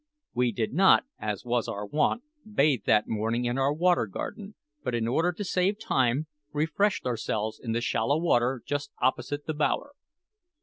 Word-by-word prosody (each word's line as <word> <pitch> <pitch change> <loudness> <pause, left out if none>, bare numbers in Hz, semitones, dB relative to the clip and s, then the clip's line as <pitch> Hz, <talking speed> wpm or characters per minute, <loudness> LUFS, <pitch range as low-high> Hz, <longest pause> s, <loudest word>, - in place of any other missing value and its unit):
We 125 -1 +2
did 110 +1 -2
not, 190 - +5
as 105 +1 -3
was 120 -1 0
our 100 +1 -4
wont, 150 - +1 0.3
bathe 140 - +2
that 105 -1 +3
morning 115 +3 -1
in 120 +2 0
our 135 +1 +3
Water 170 -4 +2
Garden, 200 - -6 0.3
but 125 -2 -1
in 115 -1 0
order 165 +9 +2
to 190 +4 -5
save 190 +2 +1
time, 130 - +1 0.3
refreshed 160 +7 0
ourselves 110 -3 -2
in 115 -3 -2
the 120 - 0
shallow 120 +4 +1
water 130 -6 +1
just 145 0 -2
opposite 145 +3 0
the 155 - -2
bower. 155 - 0
130 Hz, 170 wpm, -28 LUFS, 115-160 Hz, 0.3 s, not